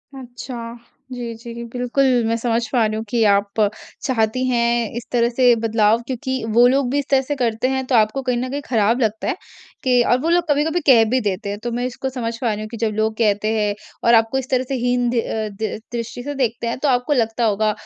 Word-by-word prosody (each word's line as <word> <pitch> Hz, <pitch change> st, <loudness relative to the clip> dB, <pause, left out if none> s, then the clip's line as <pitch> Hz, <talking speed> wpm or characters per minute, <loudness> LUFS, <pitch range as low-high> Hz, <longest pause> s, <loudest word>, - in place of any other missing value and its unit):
अच्छा। 245 Hz, -2 st, -8 dB, 0.3 s
जी, 240 Hz, -2 st, -5 dB
जी, 235 Hz, +1 st, -8 dB
बिल्कुल, 250 Hz, +2 st, +1 dB, 0.2 s
मैं 230 Hz, -, +1 dB
समझ 230 Hz, 0 st, -1 dB
पा 240 Hz, -4 st, +3 dB
रही 215 Hz, 0 st, -1 dB
हूँ 220 Hz, -, -3 dB
कि 235 Hz, 0 st, +1 dB
आप 200 Hz, +1 st, 0 dB, 0.4 s
चाहती 255 Hz, -1 st, 0 dB
हैं 235 Hz, -2 st, +1 dB
इस 240 Hz, -, -5 dB
तरह 235 Hz, -1 st, +2 dB
से 245 Hz, 0 st, +4 dB
बदलाव 225 Hz, 0 st, +2 dB
क्योंकि 260 Hz, 0 st, -3 dB
वो 240 Hz, +2 st, +6 dB
लोग 265 Hz, 0 st, +2 dB
भी 285 Hz, -, +1 dB
इस 285 Hz, -, -3 dB
तरह 270 Hz, -1 st, +4 dB
से 290 Hz, +2 st, -3 dB
करते 240 Hz, -2 st, 0 dB
हैं 265 Hz, 0 st, -1 dB
तो 255 Hz, -, 0 dB
आपको 220 Hz, +4 st, +2 dB
कहीं 250 Hz, -2 st, -1 dB
न 255 Hz, +1 st, -2 dB
कहीं 285 Hz, +1 st, -3 dB
खराब 230 Hz, 0 st, +2 dB
लगता 220 Hz, -1 st, -1 dB
है -, -, 0 dB, 0.5 s
कि 250 Hz, -2 st, +4 dB
और 245 Hz, -, +4 dB
वो 325 Hz, -, 0 dB
लोग 345 Hz, +1 st, +3 dB
कभी-कभी 300 Hz, +4 st, +2 dB
कह 240 Hz, -5 st, +7 dB
भी 255 Hz, +2 st, +2 dB
देते 200 Hz, -2 st, -2 dB
हैं 205 Hz, 0 st, -4 dB
तो 240 Hz, -, -2 dB
मैं 245 Hz, +1 st, -2 dB
इसको 255 Hz, +1 st, -4 dB
समझ 235 Hz, -3 st, -4 dB
पा 245 Hz, -, -1 dB
रही 210 Hz, -, -3 dB
हूँ 215 Hz, -, -5 dB
कि 230 Hz, -, -6 dB
जब 220 Hz, -1 st, 0 dB
लोग 220 Hz, 0 st, 0 dB
कहते 210 Hz, -2 st, +1 dB
हैं 210 Hz, -1 st, +1 dB, 0.3 s
और 235 Hz, -, +6 dB
आपको 225 Hz, +3 st, +3 dB
इस 265 Hz, -1 st, -4 dB
तरह 255 Hz, -1 st, +1 dB
से 270 Hz, -, -1 dB
हीन 245 Hz, 0 st, +1 dB
द्रि 235 Hz, -1 st, +1 dB
अ, 220 Hz, -1 st, -3 dB
दि 215 Hz, +2 st, -4 dB, 0.2 s
दृष्टि 235 Hz, +1 st, -5 dB
से 290 Hz, +2 st, -5 dB
देखते 240 Hz, -3 st, -1 dB
हैं 235 Hz, -, -2 dB
तो 295 Hz, -, 0 dB
आपको 250 Hz, +3 st, +1 dB
लगता 230 Hz, -2 st, 0 dB
होगा 215 Hz, 0 st, +2 dB
240 Hz, 240 wpm, -20 LUFS, 225-255 Hz, 0.5 s, कह